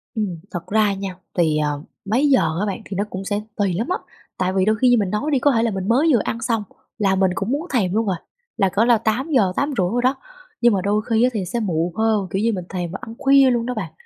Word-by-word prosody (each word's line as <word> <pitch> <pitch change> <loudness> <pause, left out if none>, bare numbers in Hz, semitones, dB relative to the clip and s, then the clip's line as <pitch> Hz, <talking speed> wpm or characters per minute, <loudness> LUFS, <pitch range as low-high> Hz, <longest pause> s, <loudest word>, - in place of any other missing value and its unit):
Ừm, 190 -7 -2
thật 175 -3 -6
ra 210 -1 +2
nha, 195 -1 -5 0.2
thì 160 -3 +2
ờ, 150 -1 -1 0.2
mấy 250 +9 +2
giờ 265 - +5 0.2
á 210 - 0
bạn 205 +3 -4
thì 195 - -6
nó 200 - +1
cũng 190 +1 -6
sẽ 205 +1 -1
tùy 200 -4 0
lắm 220 +7 -2
á. 365 - +1 0.4
Tại 185 0 0
vì 190 0 +2
đôi 215 - +3
khi 250 +3 +3
như 245 - +5
mình 200 -4 0
nói 280 +10 -1
đi, 270 - +3
có 285 - +3
thể 230 -2 +2
là 230 - +1
mình 190 0 -4
mới 265 +8 +3
vừa 240 - +4
ăn 230 - -3
xong 230 -3 0 0.3
là 195 -2 +2
mình 190 -1 +2
cũng 245 - -2
muốn 305 +6 -2
thèm 190 -7 +1
luôn 220 -2 +1
à, 180 - -1 0.4
là 195 -3 +3
cỡ 205 +4 +2
là 240 -1 +5
8 230 +7 -1
giờ, 195 -9 +3
8,5 275 -10 0
đồ 245 +1 0
đó, 260 +2 +2 0.5
nhưng 240 -2 +5
mà 190 - +1
đôi 205 +2 +1
khi 225 +1 +3
á 250 - +4
thì 200 -5 -2
sẽ 235 +5 -2
muộn 170 -4 -1
hơn, 220 -3 +1
kiểu 195 - -1
như 230 - +2
mình 180 -3 -4
thèm 175 -3 -4
và 195 - -6
ăn 225 - -8
khuya 275 -1 +5
luôn 235 -1 0
đó 250 - -2
bạn. 190 -9 -5
210 Hz, 285 wpm, -21 LUFS, 190-240 Hz, 0.5 s, giờ